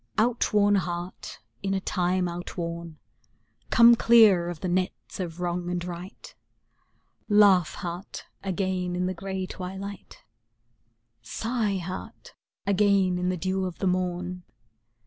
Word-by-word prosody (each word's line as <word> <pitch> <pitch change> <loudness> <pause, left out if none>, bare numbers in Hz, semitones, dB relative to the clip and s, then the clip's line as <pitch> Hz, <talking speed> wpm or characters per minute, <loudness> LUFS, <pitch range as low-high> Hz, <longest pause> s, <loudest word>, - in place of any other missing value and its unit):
Out 235 +2 +2
worn 205 -1 +4
heart, 180 -1 -3 0.2
in 195 0 -1
a - - +1
time 180 -1 0
out 175 +2 -6
worn, 170 -2 -5 0.7
Come 235 +1 +8
clear 220 -7 +6
of 175 -3 -7
the 185 - -2
nets 185 +2 -2
of 175 -2 -5
wrong 175 0 -2
and 175 -1 -2
right; 180 +2 -8 1.0
Laugh, 200 -5 +5
heart, 175 +3 -6 0.2
again 185 -2 -2
in 180 0 0
the 185 - -1
gray 190 +1 -4
twilight; 195 +2 -8 1.0
Sigh, 215 - -2
heart, 180 +1 -7 0.3
again 195 -2 +3
in 180 0 0
the 185 - -1
dew 185 +2 -1
of 180 -2 -5
the - - -3
morn. 180 0 -1
185 Hz, 130 wpm, -26 LUFS, 175-195 Hz, 1.0 s, Come